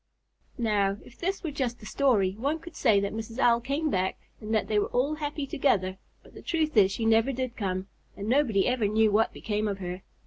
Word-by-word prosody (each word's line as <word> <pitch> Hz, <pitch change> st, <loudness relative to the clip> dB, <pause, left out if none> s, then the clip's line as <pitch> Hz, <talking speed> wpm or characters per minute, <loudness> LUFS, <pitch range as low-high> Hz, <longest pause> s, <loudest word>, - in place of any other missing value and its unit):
Now, 205 Hz, -4 st, +1 dB
if 240 Hz, -, -15 dB
this 385 Hz, +3 st, -2 dB
were 320 Hz, -, -2 dB
just 255 Hz, -4 st, -2 dB
a -, -, -9 dB
story, 215 Hz, -8 st, +2 dB
one 275 Hz, +10 st, -2 dB
could 330 Hz, 0 st, -12 dB
say 220 Hz, -6 st, +4 dB
that 200 Hz, 0 st, -2 dB
Mrs. 225 Hz, +1 st, -6 dB
Owl 235 Hz, -3 st, +4 dB
came 280 Hz, +5 st, -1 dB
back 185 Hz, 0 st, 0 dB, 0.2 s
and 215 Hz, 0 st, -6 dB
that 220 Hz, -1 st, +1 dB
they 210 Hz, -1 st, +2 dB
were -, -, 0 dB
all 270 Hz, +5 st, 0 dB
happy 295 Hz, -1 st, -3 dB
together; 190 Hz, -9 st, 0 dB, 0.2 s
but -, -, -18 dB
the -, -, -11 dB
truth 315 Hz, -3 st, -1 dB
is 195 Hz, -3 st, +6 dB
she 225 Hz, +3 st, -2 dB
never 225 Hz, +4 st, +4 dB
did 255 Hz, -1 st, -3 dB
come, 185 Hz, -3 st, -2 dB, 0.3 s
and 200 Hz, -, -5 dB
nobody 235 Hz, -6 st, +3 dB
ever 250 Hz, -4 st, +1 dB
knew 215 Hz, +1 st, +3 dB
what 220 Hz, +2 st, +3 dB
became 210 Hz, 0 st, -2 dB
of 200 Hz, -2 st, -2 dB
her. 180 Hz, -1 st, -5 dB
225 Hz, 220 wpm, -28 LUFS, 200-275 Hz, 0.3 s, is